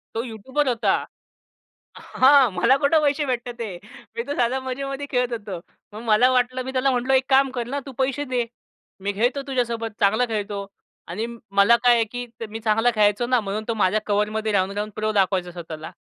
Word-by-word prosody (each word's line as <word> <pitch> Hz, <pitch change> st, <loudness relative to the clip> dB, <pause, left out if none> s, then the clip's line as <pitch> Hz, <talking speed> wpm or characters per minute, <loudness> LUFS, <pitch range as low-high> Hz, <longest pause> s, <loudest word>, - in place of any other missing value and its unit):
तो 225 Hz, -, -1 dB
युट्युबर 260 Hz, +5 st, -2 dB
होता. 225 Hz, -5 st, +2 dB, 1.0 s
हां, 265 Hz, -2 st, +4 dB
मला 265 Hz, -, +3 dB
कुठं 305 Hz, +2 st, +3 dB
पैसे 290 Hz, 0 st, +1 dB
भेटत 245 Hz, -2 st, -4 dB
आहे? 200 Hz, -6 st, -5 dB, 0.4 s
मी 235 Hz, -, -2 dB
तर 285 Hz, -, -2 dB
साधं 245 Hz, +2 st, +1 dB
मजेमध्ये 275 Hz, +2 st, -4 dB
खेळत 250 Hz, -1 st, +1 dB
होतो. 205 Hz, -6 st, -5 dB, 0.3 s
मग 215 Hz, -, -7 dB
मला 220 Hz, +4 st, +5 dB
वाटलं, 255 Hz, 0 st, +1 dB
मी 260 Hz, -, -4 dB
त्याला 265 Hz, +1 st, +2 dB
म्हटलो, 255 Hz, +1 st, 0 dB
"एक 260 Hz, 0 st, +3 dB
काम 270 Hz, 0 st, +4 dB
कर 240 Hz, -2 st, -4 dB
ना, 280 Hz, +3 st, -2 dB
तू 275 Hz, -, -8 dB
पैसे 275 Hz, +2 st, 0 dB
दे, 250 Hz, -3 st, -1 dB, 0.6 s
मी 205 Hz, -, -1 dB
खेळतो 245 Hz, +7 st, 0 dB
तुझ्यासोबत, 235 Hz, -4 st, -2 dB
चांगला 215 Hz, +5 st, +3 dB
खेळतो." 205 Hz, -3 st, -3 dB, 0.4 s
आणि 195 Hz, +6 st, -3 dB, 0.3 s
मला 200 Hz, +4 st, +5 dB
काय 245 Hz, -1 st, +6 dB
आहे, 230 Hz, -, +3 dB
की 245 Hz, +3 st, -6 dB, 0.2 s
मी 225 Hz, +1 st, -6 dB
चांगला 225 Hz, +2 st, +2 dB
खेळायचो 210 Hz, +2 st, +3 dB
ना, 250 Hz, 0 st, +3 dB
म्हणून 205 Hz, +1 st, -3 dB
तो 230 Hz, -, 0 dB
माझ्या 185 Hz, +4 st, +3 dB
कव्हरमध्ये 215 Hz, +1 st, 0 dB
राहून-राहून 200 Hz, +2 st, 0 dB
प्रो 215 Hz, 0 st, -1 dB
दाखवायचा 190 Hz, -3 st, +1 dB
स्वतःला. 165 Hz, -2 st, -8 dB
235 Hz, 185 wpm, -23 LUFS, 210-260 Hz, 1.0 s, काय